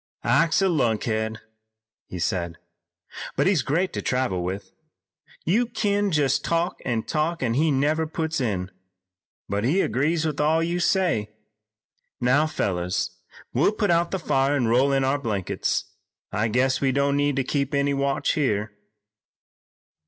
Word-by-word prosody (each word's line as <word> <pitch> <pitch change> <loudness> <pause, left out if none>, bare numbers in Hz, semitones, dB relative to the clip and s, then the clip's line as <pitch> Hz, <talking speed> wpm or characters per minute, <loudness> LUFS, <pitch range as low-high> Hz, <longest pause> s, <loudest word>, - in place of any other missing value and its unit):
"Ike's 165 +3 +3
a - - +4
lunkhead," 110 - 0 0.7
he 90 - -7
said, 85 -2 -2 0.8
"but - - +2
he's 190 -6 +3
great 165 +9 0
to - - -3
travel 125 -9 -1
with. 95 +1 -5 0.7
You 225 +9 +2
kin 205 -3 0
jest 145 -2 +2
talk 170 +2 -1
an' 115 -3 -1
talk 155 +1 -1
an' 115 -2 +1
he 155 +6 +2
never 150 +3 +1
puts 160 -1 -2
in, 95 -6 -2 0.8
but 100 +1 -1
agrees 155 - +1
with 150 -2 -2
all 160 +2 +3
you 170 +1 -1
say. 175 - +1 0.9
Now, 135 +5 +3
fellers, 90 - -1 0.4
we'll 140 - +3
put 210 -3 +1
out 170 0 +2
the 190 - -1
fire 140 -4 +1
an' 125 -5 +1
roll 130 +4 +3
in 135 -1 +2
our 135 +2 +1
blankets. 105 -8 -2 0.4
I 110 +1 0
guess 125 +4 +1
we 135 -1 +2
don't 140 +1 +1
need 145 -1 +1
to 135 - +1
keep 140 +2 -1
any 140 0 +2
watch 140 0 0
here." 110 -7 0
140 Hz, 150 wpm, -24 LUFS, 115-160 Hz, 0.9 s, a